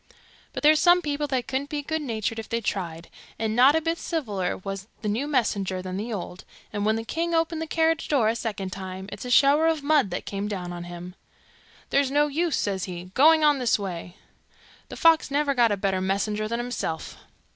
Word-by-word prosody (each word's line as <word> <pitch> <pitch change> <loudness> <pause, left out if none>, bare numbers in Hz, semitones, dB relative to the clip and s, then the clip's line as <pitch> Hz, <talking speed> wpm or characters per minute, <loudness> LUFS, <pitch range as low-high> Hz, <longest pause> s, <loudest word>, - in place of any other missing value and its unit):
But - - -6
there's 305 +1 +6
some 355 0 +5
people 295 0 -1
that 260 -3 -2
couldn't 275 +2 -2
be 295 -2 -3
good 315 +2 -2
natured 225 -4 -3
if 220 - -8
they 230 - 0
tried, 170 -6 -4 0.3
and 220 0 -1
not 260 +5 +6
a 320 - +2
bit 330 +1 -1
civiller 210 - -2
was 195 +1 -6 0.2
the - - -2
new 230 +8 -1
messenger 205 -9 0
than 185 0 -5
the 220 +4 -4
old, 185 -3 -6 0.3
and 205 0 -1
when 220 - +3
the 225 0 -4
king 335 +6 -1
opened 325 0 0
the 320 - -3
carriage 325 0 +1
door 265 -7 +2
a 225 - +1
second 205 -5 -4
time, 190 0 -7
it's 250 - -6
shower 285 +5 +5
of 320 -3 0
mud 290 -7 +3
that 175 - -4
came 200 +1 -3
down 180 -4 -4
on 175 0 -6
him. 175 +1 -8 0.8
'There's 280 -1 +3
no 290 +2 +3
use,' 315 +3 0
says 195 -2 -1
he, 180 0 -8
'going 315 +5 +6
on 295 -2 +4
this 245 -2 +2
way. 180 -3 -6 0.7
The - - -8
fox 325 -2 +4
never 285 0 +1
got 240 -4 +3
a 205 - 0
better 190 -1 0
messenger 205 +3 -1
than 235 +2 -2
himself. 240 -10 -4
230 Hz, 210 wpm, -25 LUFS, 195-295 Hz, 0.8 s, there's